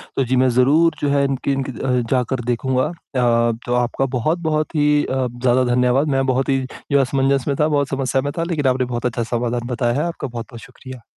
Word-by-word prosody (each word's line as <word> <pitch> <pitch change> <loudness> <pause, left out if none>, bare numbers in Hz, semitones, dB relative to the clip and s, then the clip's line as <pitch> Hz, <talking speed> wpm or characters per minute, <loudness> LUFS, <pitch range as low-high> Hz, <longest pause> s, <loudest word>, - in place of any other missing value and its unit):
तो 135 - +1
जी, 130 +2 0
मैं 130 0 +3
ज़रूर, 145 +7 +3
जो 145 - +1
है, 140 - +3
इनकी 135 0 -1
इनकी 135 -1 -3
अ, 130 +1 -3 0.2
जाकर 130 -1 0
देखूँगा। 130 +2 0
अ, 120 -8 0
तो 120 - -1
आपका 125 +2 0
बहुत-बहुत 155 +4 -1
ही 150 0 +3
अ, 130 -1 -1
ज़्यादा 130 0 +3
धन्यवाद, 125 +4 +2
मैं 135 -1 +1
बहुत 130 +1 0
ही, 135 0 +2 0.3
जो 140 - +4
है, 140 - +5
असमंजस 135 0 +1
में 140 - +1
था, 150 - +3
बहुत 145 -2 0
समस्या 135 -1 0
में 145 +1 -3
था, 165 - 0
लेकिन 155 -5 -1
आपने 130 0 +1
बहुत 120 0 -4
अच्छा 120 -1 -1
समाधान 120 0 -2
बताया 120 -1 0
है। - - 0
आपका 165 -4 -5
बहुत-बहुत 120 0 -8
शुक्रिया। 130 0 -12
130 Hz, 220 wpm, -20 LUFS, 125-140 Hz, 0.3 s, है